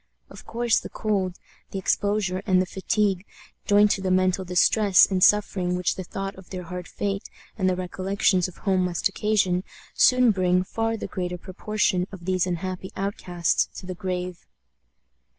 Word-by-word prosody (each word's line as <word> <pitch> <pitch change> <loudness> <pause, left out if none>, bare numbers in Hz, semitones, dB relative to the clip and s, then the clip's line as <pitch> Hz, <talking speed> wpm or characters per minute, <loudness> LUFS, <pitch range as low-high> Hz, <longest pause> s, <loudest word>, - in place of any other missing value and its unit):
Of - - -13
course, 235 0 +1
the - - -9
cold, 195 -4 -1 0.3
the - - -5
exposure, 190 -1 0
and 185 -1 +4
the 185 - +2
fatigue, 195 0 0 0.4
joined 205 0 +5
to 195 - 0
the 190 - -1
mental 185 0 +2
distress 185 +1 +5
and 185 -2 0
suffering 190 -3 +3
which 180 -1 0
the 185 - -6
thought 195 +2 -5
of 190 - -14
their 185 -1 -6
hard 180 +1 -7
fate 195 -1 -3 0.3
and 190 -3 +1
the 185 - +1
recollections 185 0 0
of 180 - -13
home 190 -2 +1
must 175 -1 0
occasion, 195 -3 +1 0.3
soon 255 -3 +5
bring 180 -2 +2
far 225 +3 -2
the - - -5
greater 180 -2 -4
proportion 185 0 -1
of 185 -3 -10
these 185 -1 +1
unhappy 185 +1 -4
outcasts 180 -4 0
to - - -11
the 185 - -5
grave. 180 -1 -5
185 Hz, 170 wpm, -25 LUFS, 180-200 Hz, 0.4 s, joined